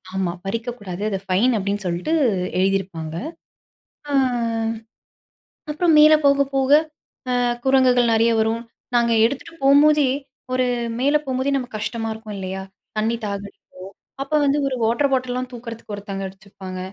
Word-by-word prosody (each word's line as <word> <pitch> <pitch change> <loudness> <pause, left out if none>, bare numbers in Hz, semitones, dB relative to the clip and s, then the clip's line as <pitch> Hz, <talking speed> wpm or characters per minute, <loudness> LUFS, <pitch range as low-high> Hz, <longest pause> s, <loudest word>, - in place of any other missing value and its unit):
ஆமா, 185 -3 -1
"பறிக்க 230 +4 -3
கூடாது. 190 -1 -7
அத 195 - -1
ஃபைன்." 200 +7 +2
அப்படீன்னு 200 0 -3
சொல்ட்டு 175 - -2 0.5
எழுதியிருப்பாங்க. 185 -4 -1 1.0
அ - - -1 1.6
அப்புறம் 325 +2 +2
மேல 305 +1 +8
போக 280 0 +5
போக 270 0 +1 0.6
அ - - +1 0.3
குரங்குகள் 255 -3 +4
நெறைய 230 +1 +3
வரும். 225 +1 0 0.3
நாங்க 235 -1 +3
எடுத்துட்டு 280 +6 -3
போகும்போதே, 285 0 +5 0.4
ஒரு 255 0 +2 0.3
மேல 285 +4 +3
போம்போதே 260 +1 -1
நமக்கு 245 -4 -5
கஷ்டமா 225 0 -3
இருக்கும் 220 -2 -8
இல்லையா? 190 0 -5 0.3
தண்ணி 225 +2 +1
தாகம் 200 0 -4
அடிக்கும். - - -19 0.6
அப்ப 285 - -9
வந்து 280 +1 +2
1 260 - -2
வாட்டர் 270 +5 +1
பாட்டல்லாம் 255 0 -1
தூக்கறதுக்கு 230 -2 -8
ஒருத்தங்க 195 -1 -6
வச்சிருப்பாங்க. 190 -1 -10
230 Hz, 135 wpm, -22 LUFS, 195-265 Hz, 1.6 s, மேல